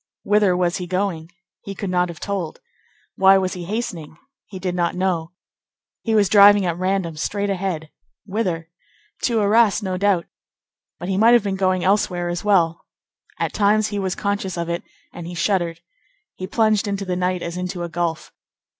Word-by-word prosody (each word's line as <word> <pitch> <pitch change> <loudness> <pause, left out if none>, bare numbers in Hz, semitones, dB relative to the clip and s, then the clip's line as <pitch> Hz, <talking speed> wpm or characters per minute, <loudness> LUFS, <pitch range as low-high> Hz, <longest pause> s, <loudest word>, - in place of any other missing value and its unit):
Whither 205 -3 +3
was 180 0 +1
he 180 -2 -5
going? 185 -3 -2 0.3
He 200 - -7
could 195 -1 -4
not 180 -1 +1
have 170 - -9
told. 195 -6 -4 0.6
Why 195 0 +6
was 185 -1 -1
he 180 -2 -6
hastening? 180 -7 -5 0.3
He 195 - -8
did 185 -1 -3
not 175 -1 0
know. 180 -2 -1 0.7
He 225 -1 0
was 205 -2 +4
driving 205 0 +7
at 170 -2 0
random, 185 -3 -1
straight 200 +5 -1
ahead. 180 -5 -3 0.3
Whither? 180 -6 -2 0.5
To 230 -3 +1
Arras, 210 +1 +3
no 185 -1 -2
doubt; 195 -3 +2 0.7
but 175 - -6
he 190 0 -1
might 225 +3 +6
have 235 - +3
been 200 -2 -1
going 185 -1 +1
elsewhere 180 -3 +1
as 175 0 -3
well. 175 -5 +2 0.5
At - - -2
times 215 +1 +2
he 205 0 -3
was 190 -1 -2
conscious 200 -2 -2
of 170 0 -3
it, 170 +1 -2 0.3
and 170 -1 -8
he 175 - -7
shuddered. 170 -1 0 0.5
He 185 - -6
plunged 215 0 +2
into 200 -1 -2
the 180 -1 -2
night 180 0 -1
as 170 0 -5
into 180 0 -4
a - - -3
gulf. 170 -1 -3
185 Hz, 180 wpm, -21 LUFS, 175-200 Hz, 0.7 s, driving